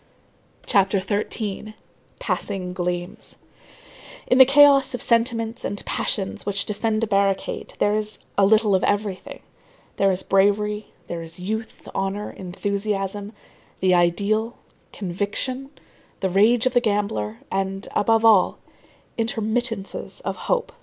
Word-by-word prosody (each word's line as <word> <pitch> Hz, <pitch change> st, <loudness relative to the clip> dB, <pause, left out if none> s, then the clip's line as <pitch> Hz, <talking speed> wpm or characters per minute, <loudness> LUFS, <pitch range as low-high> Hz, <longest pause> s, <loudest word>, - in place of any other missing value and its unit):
CHAPTER 195 Hz, 0 st, +3 dB
XIII—PASSING 205 Hz, -2 st, -4 dB
GLEAMS 180 Hz, +3 st, -4 dB, 0.9 s
In 255 Hz, -, +3 dB
the 260 Hz, -, +11 dB
chaos 275 Hz, -1 st, +6 dB
of 245 Hz, -, -6 dB
sentiments 230 Hz, 0 st, 0 dB
and 205 Hz, -, -4 dB
passions 195 Hz, -2 st, -2 dB
which 200 Hz, 0 st, -2 dB
defend 215 Hz, +1 st, -1 dB
a -, -, +4 dB
barricade, 200 Hz, -2 st, -1 dB
there 205 Hz, -, +2 dB
is 215 Hz, 0 st, -2 dB, 0.2 s
a 200 Hz, -, +3 dB
little 210 Hz, +1 st, +4 dB
of 190 Hz, -, +2 dB
everything; 205 Hz, -2 st, -2 dB, 0.6 s
there 195 Hz, 0 st, +3 dB
is 185 Hz, 0 st, -1 dB
bravery, 210 Hz, +2 st, +2 dB, 0.2 s
there 170 Hz, -1 st, -5 dB
is 165 Hz, 0 st, -9 dB
youth, 220 Hz, +5 st, -5 dB
honor, 195 Hz, +2 st, -2 dB
enthusiasm, 200 Hz, +2 st, -3 dB, 0.5 s
the 185 Hz, -1 st, +3 dB
ideal, 205 Hz, +7 st, +1 dB, 0.3 s
conviction, 205 Hz, +8 st, -3 dB, 0.5 s
the 190 Hz, -1 st, 0 dB
rage 220 Hz, +6 st, +4 dB
of 255 Hz, -, +2 dB
the 245 Hz, -, +4 dB
gambler, 200 Hz, -, -1 dB
and, 195 Hz, 0 st, -2 dB
above 225 Hz, +1 st, +3 dB
all, 215 Hz, -5 st, +5 dB, 0.6 s
intermittences 225 Hz, -1 st, -2 dB
of -, -, -3 dB
hope. -, -, -1 dB
205 Hz, 120 wpm, -23 LUFS, 195-225 Hz, 0.9 s, the